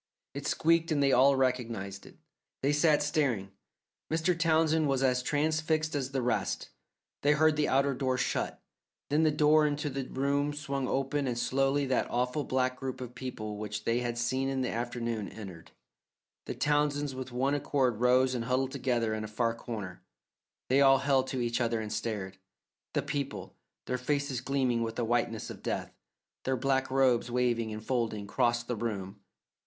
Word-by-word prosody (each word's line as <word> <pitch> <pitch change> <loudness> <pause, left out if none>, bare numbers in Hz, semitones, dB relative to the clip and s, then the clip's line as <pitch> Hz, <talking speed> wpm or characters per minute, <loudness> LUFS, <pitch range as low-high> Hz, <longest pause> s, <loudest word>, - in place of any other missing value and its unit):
It 140 0 -4
squeaked 165 0 +2
and 145 -2 +2
they 135 - +4
all 135 +2 +6
recognized 115 -7 -1
it. - - -16 0.5
They 140 +2 +3
sat 150 0 +4
staring. 140 - 0 0.6
Mr. 165 +3 +2
Townsend 160 -1 +3
was 135 -1 +1
as 125 -1 +2
transfixed 155 +2 0
as 135 -3 -1
the 135 -2 -2
rest. 125 - -1 0.5
They 145 +1 +4
heard 155 +1 +4
the 150 0 +1
outer 140 +1 +2
door 130 -1 0
shut, 130 - -2 0.5
then 150 +2 +3
the 160 - +4
door 150 +1 +4
into 150 0 -2
the 135 0 -3
room 140 +2 0
swung 140 -3 -3
open 135 +1 0
and 120 -2 -2
slowly 135 +3 +1
that 130 -1 0
awful 125 +4 0
black 130 -1 0
group 130 -1 -4
of 125 -1 -7
people 110 -5 -5
which 105 -1 -4
they 115 +1 +2
had 120 -1 -2
seen 130 +3 0
in 135 -1 -1
the 125 - -1
afternoon 115 -2 -3
entered. 95 -6 -10 0.8
The - - -4
Townsends 145 -1 +1
with 130 0 -6
one 130 +3 0
accord 135 -5 +1
rose 125 +1 +4
and 120 -2 -2
huddled 130 +1 0
together 120 -5 0
in 110 0 -3
a - - -4
far 115 +2 0
corner; 105 -6 -7 0.7
they 135 +2 +4
all 135 -1 +7
held 135 -1 +2
to 130 -2 -2
each 120 +1 0
other 115 -1 +1
and 110 -1 -4
stared. 105 -4 -4 0.6
The 145 - +1
people, 140 -1 -4 0.3
their 125 0 -2
faces 140 -1 -1
gleaming 130 -3 0
with 115 -1 -3
a 120 - 0
whiteness 115 -1 -1
of - - -10
death, - - -3 0.5
their 130 0 0
black 135 +1 +1
robes 130 -3 +3
waving 120 -2 0
and 110 0 -7
folding, 115 -5 -1
crossed 120 +3 0
the 120 - -1
room. 100 -3 -4
130 Hz, 180 wpm, -30 LUFS, 120-145 Hz, 0.8 s, all